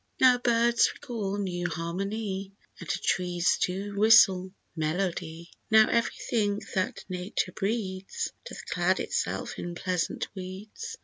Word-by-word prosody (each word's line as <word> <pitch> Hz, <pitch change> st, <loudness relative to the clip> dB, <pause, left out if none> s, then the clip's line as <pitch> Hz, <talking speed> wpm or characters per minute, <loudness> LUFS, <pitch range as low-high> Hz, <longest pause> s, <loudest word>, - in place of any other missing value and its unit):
Now 250 Hz, -1 st, +6 dB
birds 235 Hz, -1 st, +3 dB
recall 205 Hz, -5 st, -4 dB
new 175 Hz, -3 st, -2 dB
harmony, 195 Hz, +4 st, -3 dB, 0.3 s
And -, -, -9 dB
trees 180 Hz, -1 st, +1 dB
do 195 Hz, +3 st, -1 dB
whistle 200 Hz, -3 st, +6 dB, 0.2 s
melody; 170 Hz, 0 st, -2 dB, 0.2 s
Now 220 Hz, -1 st, +7 dB
everything 215 Hz, -3 st, 0 dB
that 185 Hz, -1 st, -1 dB
nature 185 Hz, 0 st, -2 dB
breeds, 195 Hz, -2 st, -3 dB, 0.2 s
Doth -, -, -9 dB
clad -, -, +1 dB
itself -, -, -2 dB
in 175 Hz, 0 st, -5 dB
pleasant 180 Hz, -1 st, -1 dB
weeds. 205 Hz, -, -7 dB
195 Hz, 115 wpm, -28 LUFS, 180-220 Hz, 0.3 s, Now